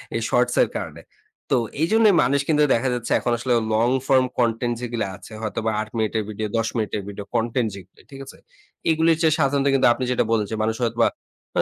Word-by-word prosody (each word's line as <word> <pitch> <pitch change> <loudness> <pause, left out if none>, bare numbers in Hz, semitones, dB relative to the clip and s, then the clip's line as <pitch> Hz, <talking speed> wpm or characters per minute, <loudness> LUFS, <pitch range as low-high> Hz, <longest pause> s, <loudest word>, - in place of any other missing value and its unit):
এই 115 - -1
শর্টসের 125 0 +2
কারণে। - - -7 0.5
তো - - +5 0.3
এইজন্যই 215 +2 +4
মানুষ 140 +3 +2
কিন্তু 150 -2 +3
দেখা 125 +3 +1
যাচ্ছে 120 -2 -4
এখন 120 - -1
আসলে 125 +1 -1 0.2
long-form 130 +3 +2
content 120 0 +1
যেগুলো 120 -3 -2
আছে, 100 - -14
হয়তোবা 110 0 -2
৮ 110 - -6
মিনিটের 110 0 0
ভিডিও, 110 +1 -3
১০ 115 0 0
মিনিটের 105 -2 -2
ভিডিও 100 0 -7
কনটেন্ট 115 +1 0
যেগুলি, 95 -1 -14
ঠিক 135 - -10
আছে? - - -13 0.5
এগুলির 160 0 +3
চেয়ে 155 -2 +3
সাধারণত 140 -1 +1
কিন্তু 135 - +4
আপনি 130 - -5
যেটা 125 - +2
বলেছেন, 110 0 -1
মানুষ 110 0 0
হয়তোবা 115 0 +2 0.5
আ - - +6
120 Hz, 185 wpm, -22 LUFS, 110-135 Hz, 0.5 s, আ